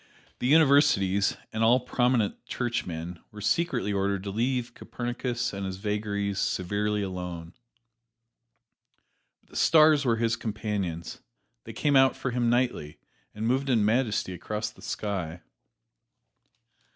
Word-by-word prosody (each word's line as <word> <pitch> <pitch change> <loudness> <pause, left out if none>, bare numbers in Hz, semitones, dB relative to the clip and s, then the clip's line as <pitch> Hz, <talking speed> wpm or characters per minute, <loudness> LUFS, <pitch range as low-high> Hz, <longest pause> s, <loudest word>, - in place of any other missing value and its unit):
The 125 - -1
Universities 140 -10 +4 0.2
and 110 +1 0
all 120 +3 +5
prominent 125 -3 0
Churchmen 90 -8 -3
were 105 - -11
secretly 105 - 0
ordered 100 -1 0
to 100 - -4
leave 120 +3 -1
Copernicus 120 -1 -3
and 100 0 -4
his 95 -1 -4
vagaries 100 -1 -2
severely 105 +2 -1
alone. 90 -3 -6 1.9
But - - -30
the - - -15
stars 155 -2 +5
were 120 -4 +2
his 115 0 +1
companions 100 -7 -4 0.4
they - - -8
came 145 -1 +1
out 135 -1 +5
for 130 - -3
him 120 -1 +1
nightly 120 -11 0 0.4
and 110 +1 -3
moved 135 +4 +1
in 115 -5 +3
majesty 110 -4 +1
across 105 +4 -4
the - - -19
sky. 90 -5 -4
105 Hz, 125 wpm, -27 LUFS, 100-125 Hz, 1.9 s, all